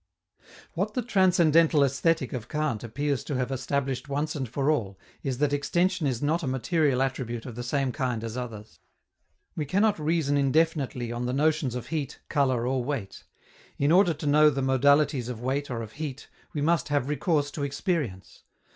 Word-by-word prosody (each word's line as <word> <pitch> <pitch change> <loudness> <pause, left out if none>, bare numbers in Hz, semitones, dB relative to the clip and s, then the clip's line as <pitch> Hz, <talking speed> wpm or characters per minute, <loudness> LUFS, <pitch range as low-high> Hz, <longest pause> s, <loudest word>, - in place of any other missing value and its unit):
What - - -2
the 250 - 0
Transcendental 170 -7 +4
Aesthetic 140 +1 +1
of 120 -2 -5
Kant 150 -8 -1
appears 140 +3 -2
to 145 - -3
have 125 +1 -1
established 135 0 -2
once 150 +2 -1
for 140 +5 +1
all 100 -10 -2 0.2
is 135 -3 -2
that 145 +1 +1
extension 175 +3 +1
is 125 -1 -2
not 155 +4 +1
a 150 - -3
material 130 +1 +1
attribute 120 -3 -3
of 125 - -7
the 120 - -6
same 135 +1 -1
kind 125 -3 -2
as 115 0 -5
others. 115 -4 -7 0.8
We 155 - -2
cannot 200 +5 +2
reason 155 -2 +1
indefinitely 140 -4 +1
on 120 +1 -3
the 125 - -1
notions 150 -2 +1
of 125 - -6
heat, 155 -5 -3
color, 130 -5 +1
or 130 0 0
weight: 120 -8 -5 0.5
in 140 +2 +2
order 175 -2 +5
to 150 - -7
know 150 +1 +6
the 135 -2 -2
modalities 140 0 +3
of 120 -3 -5
weight 135 +4 -2
or 115 -2 -3
of 110 - -9
heat, 145 -2 -6 0.2
we 150 - -3
must 165 +2 +2
have 145 -3 0
recourse 145 0 0
to 145 - -6
experience. 140 - -3
140 Hz, 180 wpm, -27 LUFS, 125-155 Hz, 0.8 s, know